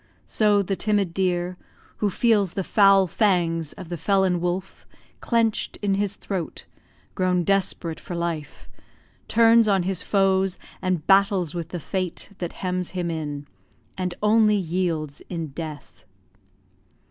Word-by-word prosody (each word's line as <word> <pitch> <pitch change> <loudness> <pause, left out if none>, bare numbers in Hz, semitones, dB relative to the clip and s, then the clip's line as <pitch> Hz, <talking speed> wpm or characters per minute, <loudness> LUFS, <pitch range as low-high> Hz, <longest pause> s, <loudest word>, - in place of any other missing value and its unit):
So 205 -2 +2
the 195 +1 -2
timid 205 -4 0
deer, 180 -1 -1 0.4
Who 210 - +1
feels 205 -3 +2
the 195 - -1
foul 195 0 +5
fangs 170 -5 +1
of 180 -3 -10
the 175 - -4
felon 190 -2 +1
wolf 180 +2 -4 0.3
Clench'd 230 -2 0
in 200 -1 +2
his 200 0 -1
throat, 185 -5 -5 0.5
grown 180 -2 +1
desperate 180 -3 0
for 175 - -7
life, 170 -3 -4 0.6
Turns 230 0 +5
on 195 -3 +3
his 190 -1 -2
foes, 195 -2 +2 0.2
and 180 -4 -1
battles 195 -4 +3
with 170 -2 -5
the 175 - -5
fate 185 +3 -3
That 175 -2 -4
hems 180 -1 -1
him 175 -1 -1
in 145 -3 -4 0.5
and 180 -1 -3
only 215 0 +4
yields 165 -5 -2
in 165 -3 -4
death. 150 0 -8
185 Hz, 135 wpm, -24 LUFS, 170-200 Hz, 0.6 s, foul